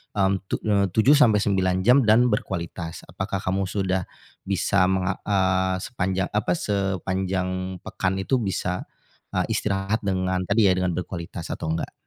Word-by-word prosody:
mmm, 95 -1 +3
tu - - -1
mmm, 100 -3 +1
7 130 +7 +6
sampe 110 -8 +5
9 95 -2 +1
jam 125 +6 +6
dan 110 +3 +5
berkualitas. 85 -5 -3
Apakah 95 0 -3
kamu 95 +1 0
sudah 95 -1 -1 0.4
bisa 95 0 +2
menga 95 0 0
eee, 95 -2 +2
sepanjang, 95 -4 -2
apa 105 0 0
sepanjang 95 - -2
pekan 95 0 -2
itu 130 +7 +1
bisa, 90 -4 -2 0.5
e - - 0
istirahat 100 +2 0
dengan 95 -1 0
tadi 105 +1 +4
ya, - - +4
dengan 90 -1 0
berkualitas 90 -2 -6
atau - - -4
enggak? 80 - -4
95 Hz, 150 wpm, -24 LUFS, 95-100 Hz, 0.5 s, 7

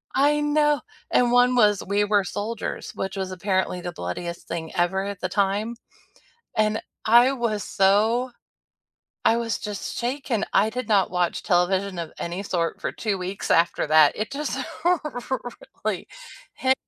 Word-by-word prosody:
I 295 +2 +3
know, 295 -2 +2 0.3
and 240 -1 +3
one 245 +1 +5
was 210 -4 +4
We 205 +1 +2
Were 205 -1 +2
Soldiers, 215 +4 -4
which 190 +1 -4
was 190 -1 -3
apparently 185 -1 -1
the 175 - -4
bloodiest 170 - -5
thing 160 -1 -4
ever 190 +2 +1
at 200 -1 -5
the 185 - -1
time, 205 +4 0 0.8
and 215 0 +2 0.3
I 240 +4 +6
was 230 -6 -1
so 220 +6 +2 0.9
I 230 - +4
was 230 -2 -1
just 210 -2 -5
shaken. 245 -3 -1
I 210 +2 +4
did 250 0 -4
not 200 -3 +3
watch 180 -1 0
television 185 +1 +1
of 165 -2 -5
any 175 +3 -4
sort 170 -4 -1
for - - -2
2 210 -4 -2
weeks 185 +2 -3
after 170 +1 +3
that, 155 -1 +6
it 215 +4 -3
just 295 +2 -3 1.2
really - - -2 0.5
hi 260 0 +3
205 Hz, 155 wpm, -24 LUFS, 185-235 Hz, 1.2 s, I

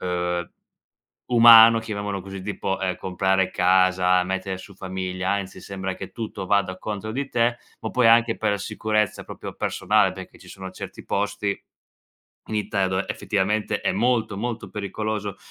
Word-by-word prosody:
uhm, 90 -1 -2 0.8
umano 115 -1 +8
chiamiamolo 100 -3 -4
così, 95 0 -8
tipo, 95 -1 -3
ehm, 95 -1 0
comprare 95 0 0
casa, 90 0 +3
mettere 95 0 -3
su 100 +1 -12
famiglia, 95 0 -4
anzi 100 -2 -4
sembra 95 -1 -5
che 95 -1 -8
tutto 110 -4 -6
vada 95 -2 +1
contro 105 0 -5
di 135 +2 -3
te, 120 0 +1 0.2
ma - - -4
poi 125 -2 +3
anche 115 0 +5
per 110 - 0
la 100 - -1
sicurezza 105 +1 -1
proprio - - -8
personale - - +1
perché - - -11
ci - - -16
sono 95 -1 -8
certi 95 - -9
posti 105 0 -2 0.9
in - - -4
Italia 100 -2 0
dove 95 +1 -1
effettivamente 105 +1 -1
è - - 0
molto, 115 -4 +1
molto 115 +2 -4
pericoloso 105 0 -4
100 Hz, 155 wpm, -24 LUFS, 95-110 Hz, 0.9 s, umano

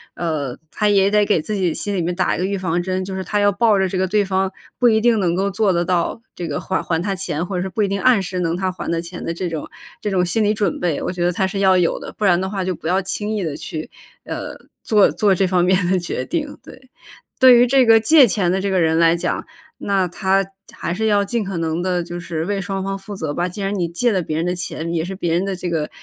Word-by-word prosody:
呃 150 -7 -3
他 210 -1 +1
也 200 0 +3
得 210 0 +4
给 205 -4 +2
自 185 +7 -4
己 185 -5 0
心 205 +4 -2
里 180 - 0
面 175 +1 -2
打 180 0 +1
一 - - -5
个 185 - 0
预 200 0 -1
防 175 -2 -1
针， 185 +1 -2
就 190 - -6
是 190 0 -3
他 205 +3 -1
要 205 0 +4
抱 215 +1 +3
着 190 -1 +2
这 185 0 -3
个 190 - +1
对 205 +1 +1
方 190 0 0 0.3
不 245 - +5
一 220 -1 +3
定 230 -1 +3
能 175 -2 +1
够 195 +2 0
做 205 0 +2
得 175 0 0
到 180 +4 0
这 175 - -5
个 145 - -3
还 190 - -2
还 165 -2 -1
他 195 +3 -1
钱， 180 -3 -3
或 190 - -5
者 180 - -1
是 190 - -3
不 210 +3 -1
一 - - +1
定 195 0 -2
按 255 -5 +5
时 185 0 -4
能 170 0 -1
他 185 0 -1
还 185 - -6
的 165 0 0
钱 170 +1 -7
的 - - -2
这 175 +2 -3
种 160 -3 -5 0.3
这 210 - -2
种 185 -2 +1
心 215 +6 +1
理 210 +1 +2
准 200 -5 -1
备， 170 -5 -1
我 - - -2
觉 175 -1 -3
得 175 - +2
他 190 +2 0
是 195 +1 -3
要 190 -1 +4
有 175 -2 +1
的， - - -8
不 210 - -1
然 175 -2 +4
的 190 - -2
话 195 -2 -3
就 185 - -1
不 160 - -7
要 185 +2 +2
轻 205 +3 -3
易 205 - -2
地 155 -4 -3
去 155 -1 -6 0.4
呃 - - -6 0.3
做 210 -6 +4
做 195 +4 +2
这 190 - +2
方 180 -1 +2
面 185 0 +2
的 185 - +2
决 175 - -4
定， 300 -4 -3
对。 260 0 -15 0.5
对 255 -2 +9
于 245 - +6
这 260 0 +4
个 225 0 +7
借 270 +4 +6
钱 190 -4 +1
的 190 +1 0
这 200 - -1
个 190 - +1
人 160 -1 +2
来 165 0 +5
讲， - - -2 0.3
那 195 -2 0
他 190 +2 +1 0.3
还 170 - -4
是 220 +4 -1
要 205 -1 +3
尽 230 +2 -1
可 195 -3 -4
能 165 +1 -1
地 180 -1 0
就 175 +1 -7
是 165 -1 -4
为 200 0 -2
双 195 +1 -3
方 195 0 -2
负 200 +1 -9
责 160 -6 -3
吧， 175 +3 -1
既 200 +3 -7
然 195 +1 -1
你 175 -2 0
借 200 +8 +1
了 185 - +1
别 155 -1 -3
人 165 - -1
的 180 - -1
钱， 170 -1 -4
也 165 -1 0
是 185 +3 -5
别 170 -3 -1
人 175 - +1
的 195 -1 -2
这 185 - -4
个 155 -3 -1
190 Hz, 315 characters per minute, -20 LUFS, 175-200 Hz, 0.5 s, 对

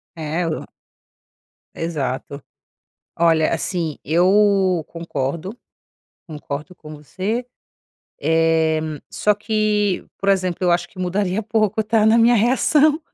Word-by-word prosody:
É 160 +2 -2
o 155 - -3 1.1
Exato. 145 -3 -4 0.8
Olha 165 -2 +3
assim, 165 -3 -3
eu 185 +1 +3
concordo, 165 - -4 0.7
concordo 150 +1 -7
com 155 -2 -11
você, 195 - -4 0.7
eh, 160 0 +2 0.3
só 210 - +1
que 210 -2 0
por 195 - -2
exemplo, 185 -3 +1
eu 180 -1 +2
acho 175 0 +1
que 190 - -18
mudaria 185 +2 -1
pouco 215 0 0
tá, 215 0 +2
na 220 +1 +5
minha 235 +1 +5
reação. 285 +7 +3
180 Hz, 110 wpm, -20 LUFS, 160-210 Hz, 1.1 s, na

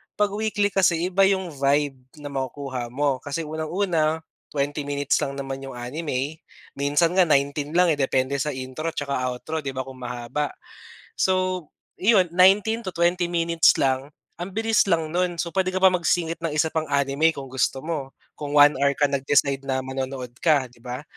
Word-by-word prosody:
'Pag 205 -1 +1
weekly 205 -1 0
kasi 180 -2 +2
iba 195 +1 +5
'yong 185 -7 -1
vibe 140 -1 +1 0.2
na 145 - -6
makukuha 130 -2 -4
mo 135 +1 0
kasi 145 +5 -4
unang-una, 160 0 -1 0.2
20 145 0 -2
minutes 145 -1 +1
lang 140 - -3
naman 135 -1 -5
'yong 135 -1 -8
anime, 140 +3 -4 0.3
minsan 145 +4 +1
nga 180 -1 +4
19 145 +1 +1
lang 180 -1 +5
eh, 145 - -1
depende 135 +1 +1
sa 150 0 -2
intro 130 +6 -5
'tsaka 140 -3 -2
outro, 155 +6 -4
'di 135 -3 -5
ba, 130 - -2
kung 130 0 -11
mahaba. 125 +4 -4 0.6
So, 185 -2 0 0.3
'yon 190 -3 +4
19-20 185 -3 +3
minutes 170 -1 +3
lang, 135 +2 0 0.3
ang 180 +2 -6
bilis 225 0 +2
lang 165 -4 +1
no'n 180 +1 0
so, 170 0 -3
puwede 185 0 0
ka 185 - -1
pa 190 - +8
magsingit 170 -2 0
ng 165 -2 -3
isa 155 +1 +2
pang 160 0 -2
anime 140 +3 +2
kung 135 -2 -8
gusto 130 0 0
mo, 150 -5 -4 0.2
kung 145 -1 -5
1 145 -1 +6
hour 140 +1 +2
ka 145 0 +1
nag-decide 140 0 +1
na 130 -1 -1
manonood 130 -1 -5
ka, 145 -6 +2
'di 120 - -22
ba? 125 +3 -6
150 Hz, 175 wpm, -24 LUFS, 135-175 Hz, 0.6 s, pa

